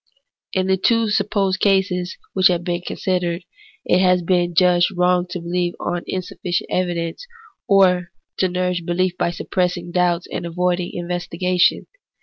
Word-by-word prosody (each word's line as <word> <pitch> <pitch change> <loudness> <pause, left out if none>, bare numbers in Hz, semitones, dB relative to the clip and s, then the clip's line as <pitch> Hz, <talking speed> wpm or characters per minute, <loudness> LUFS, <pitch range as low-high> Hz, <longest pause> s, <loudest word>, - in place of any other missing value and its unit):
In 185 -1 +1
the 190 0 +2
two 230 +3 +2
supposed 200 -2 +1
cases 185 -2 +1 0.2
which 185 -1 +5
have 175 -1 0
been 175 0 -2
con - - -4
sidered, 180 -2 -1 0.4
it 180 - +3
has 180 -1 +3
been 175 -1 +1
judged 180 0 +4
wrong 180 0 +2
to 180 - -4
beheve 175 +1 -1
on 175 0 -2
insufficient 180 -1 -3
evidence, 175 - -2 0.4
or 185 -4 +4 0.3
to 185 - +2
nourish 180 -1 -1
behef 175 +1 -1
by - - +1
suppressing 175 0 -2
doubts 175 -1 +1
and - - -4
avoiding 180 +1 -1
investigation. 175 +1 0
180 Hz, 145 wpm, -20 LUFS, 175-185 Hz, 0.4 s, which